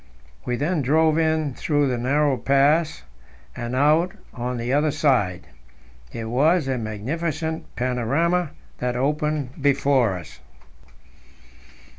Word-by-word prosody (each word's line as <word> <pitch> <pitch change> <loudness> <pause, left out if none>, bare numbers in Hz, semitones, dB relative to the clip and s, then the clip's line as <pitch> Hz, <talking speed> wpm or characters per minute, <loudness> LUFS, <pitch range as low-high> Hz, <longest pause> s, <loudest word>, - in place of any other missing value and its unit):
We 125 - -1
then 150 +5 0
drove 155 +4 +3
in 155 -3 +1
through 145 +1 0
the 125 -2 -1
narrow 140 +3 +2
pass 145 +6 +2 0.5
and 120 0 -4
out 155 +6 +3 0.2
on 125 0 -3
the 120 +2 -2
other 150 +2 +3
side. 130 - +1 0.7
It 115 - -5
was 145 +7 +2
a 130 -2 -1
magnificent 155 +9 -3
panorama 140 +8 0 0.3
that 125 0 -1
opened 150 +1 -1
before 135 -7 +2
us. 80 -3 -12
140 Hz, 115 wpm, -23 LUFS, 125-155 Hz, 0.7 s, drove